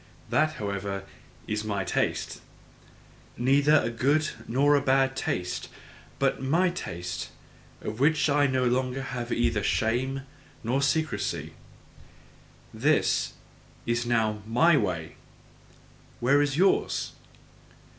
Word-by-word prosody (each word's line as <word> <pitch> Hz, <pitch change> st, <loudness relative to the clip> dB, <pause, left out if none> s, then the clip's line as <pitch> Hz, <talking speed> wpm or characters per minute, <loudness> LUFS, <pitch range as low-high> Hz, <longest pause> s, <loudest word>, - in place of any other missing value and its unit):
That, 155 Hz, +1 st, +3 dB
however, 100 Hz, -3 st, -4 dB, 0.4 s
is 105 Hz, 0 st, -2 dB
my 100 Hz, -3 st, -2 dB
taste: -, -, -1 dB, 1.0 s
Neither 140 Hz, +4 st, +4 dB
a 115 Hz, -, -1 dB
good 140 Hz, +7 st, +2 dB, 0.2 s
nor 140 Hz, +5 st, +3 dB
a 145 Hz, -, +4 dB
bad 135 Hz, -1 st, +2 dB
taste, 90 Hz, -8 st, -3 dB, 0.5 s
but -, -, +1 dB
MY 170 Hz, +7 st, +2 dB
taste, 90 Hz, -, -5 dB, 0.5 s
of 110 Hz, +2 st, -5 dB
which 155 Hz, +4 st, +3 dB
I 145 Hz, 0 st, +3 dB
have 140 Hz, -, +1 dB
no 130 Hz, -1 st, +1 dB
longer 130 Hz, +2 st, 0 dB, 0.3 s
either 115 Hz, -3 st, +1 dB
shame 125 Hz, +6 st, 0 dB, 0.4 s
or 130 Hz, +4 st, +1 dB
secrecy. 155 Hz, +1 st, -1 dB, 1.2 s
"This -, -, +1 dB, 0.5 s
is 120 Hz, +1 st, 0 dB
now 110 Hz, -3 st, +1 dB
MY 155 Hz, +9 st, +4 dB
way, 85 Hz, -, -2 dB, 1.0 s
where 140 Hz, +4 st, +4 dB
is 145 Hz, -1 st, 0 dB
yours?" 190 Hz, +3 st, +2 dB
130 Hz, 110 wpm, -27 LUFS, 110-145 Hz, 1.2 s, Neither